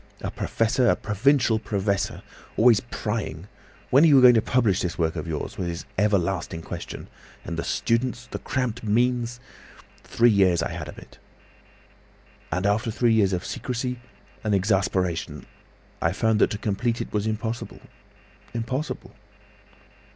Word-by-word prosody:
A - - -3
professor, 120 +2 +1
a - - +4
provincial 115 +2 +2
professor, 100 -2 -2 0.3
always 115 -2 +6
prying. 105 -7 -4 0.4
'When 135 +4 +6
are - - +7
you 140 -3 +7
going 125 -1 +8
to 115 - +4
publish 115 -7 +2
this 90 -2 -3
work 80 -1 0
of 80 0 -4
yours?' 80 -3 -4
was 90 - -2
his 85 0 -5
everlasting 95 -4 0
question. - - -7 0.4
And 85 - -4
the 80 - -3
students, 120 +6 -1
the - - -6
cramped 125 -3 -2
means! 120 +2 +1 0.6
Three 120 0 +3
years 95 -5 +3
I - - -3
had - - -6
of - - -10
it— - - -14 1.3
"And 90 +4 -1
after 110 +4 +1
three 115 +1 +2
years 100 -4 +3
of 90 0 -2
secrecy 125 +2 -3 0.4
and 105 -2 +1
exasperation, 95 -5 0 0.6
I 85 - +1
found 110 +1 +1
that - - +5
to 105 - -3
complete 115 +3 -1
it - - -5
was 105 0 0
impossible—impossible." 115 - -6
110 Hz, 145 wpm, -25 LUFS, 95-120 Hz, 1.3 s, going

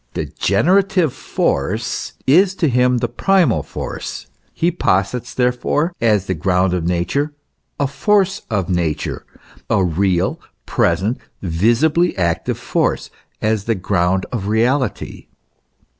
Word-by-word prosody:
The - - -2
generative 185 -3 +2
force - - -2
is 185 +7 +4
to 170 - +1
him 125 -1 +3
the - - 0
primal 190 - +2
force: - - -6 0.3
he 170 +2 0
posits, 120 - -1
therefore, 130 +7 0
as 105 -4 +2
the 95 - -1
ground 90 +2 +1
of 85 -2 -1
Nature, 140 - -1 0.4
a 140 - +2
force 195 +7 +1
of 100 -6 -1
Nature, 85 -4 -2 0.4
a 95 - +3
real, 90 +1 0 0.3
present, 95 +9 +1 0.2
visibly 120 - +2
active 85 -2 0
force, - - -1 0.3
as 110 -2 0
the 115 - +1
ground 95 0 0
of 105 -6 -3
reality. 120 +1 0
115 Hz, 120 wpm, -19 LUFS, 95-150 Hz, 0.4 s, is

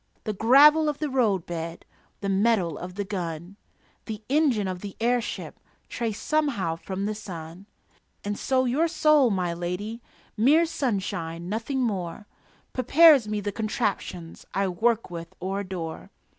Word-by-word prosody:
The 215 - -2
gravel 295 +9 +6
of 295 - -3
the 300 -3 -3
roadbed, 175 -9 -1 0.4
The 200 - -2
metal 195 -4 +2
of 180 +1 -8
the 205 - -2
gun, 175 -2 -5 0.5
The 215 -1 -6
engine 270 -9 +2
of 185 -1 -4
the 200 -2 -7
airship 240 +1 -1 0.3
Trace 225 -3 -3
somehow 265 - 0
from 190 +3 -5
the 215 - -1
sun. 180 -2 -9 0.6
And 205 0 -2
so 260 +3 +1
your 280 +7 +2
soul, 305 -5 +4
my 180 -4 -1
lady 180 +7 -4 0.3
(Mere 285 +10 +4
sunshine, 195 - -3
nothing 230 +6 -2
more) 195 -3 -3 0.5
Prepares 285 -1 +6
me 210 -1 -2
the 205 +1 -2
contraptions 205 -6 -3
I 195 0 +1
work 220 +3 0
with 170 -1 -8
or 190 +2 -2
adore. 180 -5 -6
205 Hz, 145 wpm, -26 LUFS, 180-250 Hz, 0.6 s, gravel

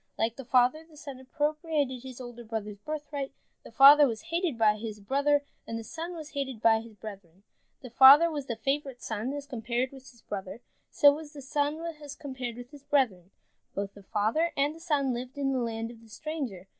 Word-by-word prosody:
Like 225 +1 0
the 270 - -9
father, 255 +5 +3
the 320 -2 -19
son 280 -4 -8
appropriated 295 -1 -1
his 260 -1 -9
older 240 -1 -9
brother's 215 -2 -5
birthright. 290 +1 -5 0.3
The - - -12
father 280 +4 +9
was 240 +7 -6
hated 340 -7 0
by 215 -2 +4
his 215 -1 -6
brother, 285 +7 +1 0.2
and 230 - -4
the 225 - -6
son 335 +7 -6
was 310 -2 -8
hated 270 -5 -4
by 220 0 +4
his 225 -1 -12
brethren. 195 -3 -11 0.4
The 250 - -9
father 280 +7 +8
was 290 -3 -4
the 235 - -2
favorite 270 +2 -2
son 220 +3 -3
as 285 0 -5
compared 245 -1 -2
with 265 -1 -13
his 235 -3 -21
brother, 195 +1 -6 0.3
so 290 -2 +6
was 300 0 -8
the 290 - -9
son 290 +3 -1 0.2
as 290 -1 -8
compared 260 -5 -6
with 245 +1 -10
his 290 -2 -13
brethren. 240 -11 +1 0.5
Both 200 0 -3
the 200 - -14
father 220 - 0
and 285 +2 +2
the 325 - -13
son 290 -6 0
lived 250 +3 -6
in 275 -1 0
the 260 - 0
land 230 -1 -3
of 230 -1 -15
the 225 - -18
stranger. 260 - -5
260 Hz, 205 wpm, -29 LUFS, 225-290 Hz, 0.5 s, father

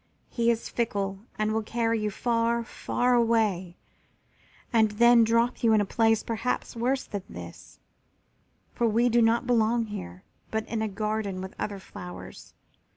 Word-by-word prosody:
He 235 -1 +1
is 230 -1 0
fickle 200 -4 -2 0.2
and 215 -1 0
will 220 +1 0
carry 230 +1 0
you 210 0 -1
far, 235 +2 0
far 245 +1 -1
away 220 -7 +1 1.0
and 220 -2 +4
then 235 +2 +5
drop 230 +2 +1
you 230 -2 +4
in 215 - +5
a 205 - +1
place 225 +2 +2
perhaps 230 +2 -2
worse 255 +3 0
than 205 - -5
this, - - -11 0.9
for 235 - +1
we 230 +3 +3
do 240 0 +3
not 230 +3 +3
belong 230 -1 +2
here, 90 - -8 0.3
but 220 0 -2
in 225 -1 -2
a 220 - 0
garden 210 -1 -2
with 190 0 -7
other 205 -1 -3
flowers. 180 -2 -10
225 Hz, 155 wpm, -27 LUFS, 210-235 Hz, 1.0 s, then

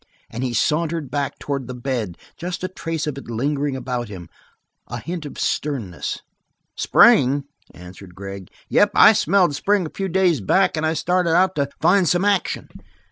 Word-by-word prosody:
As 115 - -5
he 130 -1 -1
sauntered 155 +2 0
back 140 -2 -2
towards 140 -3 -4
the 125 - -6
bed 120 -8 -3 0.2
just 175 +1 -5
a - - 0
trace 165 -4 -4
of 145 -3 -4
it 135 - -13
lingered 140 +4 -1
about 125 -2 -3
him, 90 -4 -9 0.6
a - - -5
hint 170 -3 -5
of - - -11
sternness. 120 -12 -3 0.5
"Spring?" 140 +3 +5 0.3
answered 90 +1 -12
Gregg. 95 -1 -8 0.2
"Yep, - - +3
I - - +8
smelled 180 -2 +2
spring 195 +5 +1
a 155 - -7
few 195 -1 -2
days 180 - +2
back 185 - +2
and 155 0 0
I 160 - +1
started 175 0 +1
out 185 +1 +3
to 140 -1 0
find 190 -4 +3
some 180 +2 +2
action. 200 -2 0
145 Hz, 175 wpm, -21 LUFS, 125-175 Hz, 0.6 s, I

